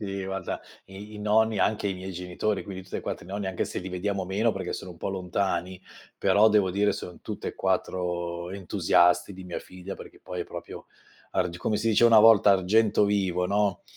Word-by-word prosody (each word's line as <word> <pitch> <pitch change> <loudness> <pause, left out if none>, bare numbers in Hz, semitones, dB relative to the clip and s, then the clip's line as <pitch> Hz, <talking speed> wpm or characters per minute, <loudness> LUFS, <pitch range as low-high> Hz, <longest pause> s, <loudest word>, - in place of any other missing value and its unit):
Sì, 100 -2 -4
guarda, 95 -1 -4 0.3
i 100 +3 -10
i - - -8
nonni 105 0 +2
anche 105 0 +1
i 95 - -1
miei 95 +1 -7
genitori, 90 +3 -2
quindi 95 -1 -7
tutti - - -6
e - - -4
4 - - -5
i - - -14
nonni, 100 0 -4
anche 95 -1 -1
se - - -4
li 95 - -6
vediamo 95 +1 -2
meno, 105 +5 +1
perché 95 -2 -4
sono 95 -2 -6
un - - -17
po' 95 - -4
lontani, 95 -1 -2 0.4
però 105 +2 +4
devo 105 -3 +3
dire 105 +2 +2
sono 90 - -7
tutt'e - - -6
4 85 -1 -2
entusiasti 90 -1 +2
di 95 0 -10
mia 90 - -5
figlia, 95 +1 -9
perché - - -12
poi 90 - -5
è - - -2
proprio - - -9 0.5
arg 90 -1 0
come 105 +3 0
si 115 +2 0
dice 110 +2 +4
una 115 -2 +8
volta, 110 -2 +7
argento 105 +3 +3
vivo, 95 -3 +1
no; 100 0 0
95 Hz, 205 wpm, -27 LUFS, 90-105 Hz, 0.5 s, una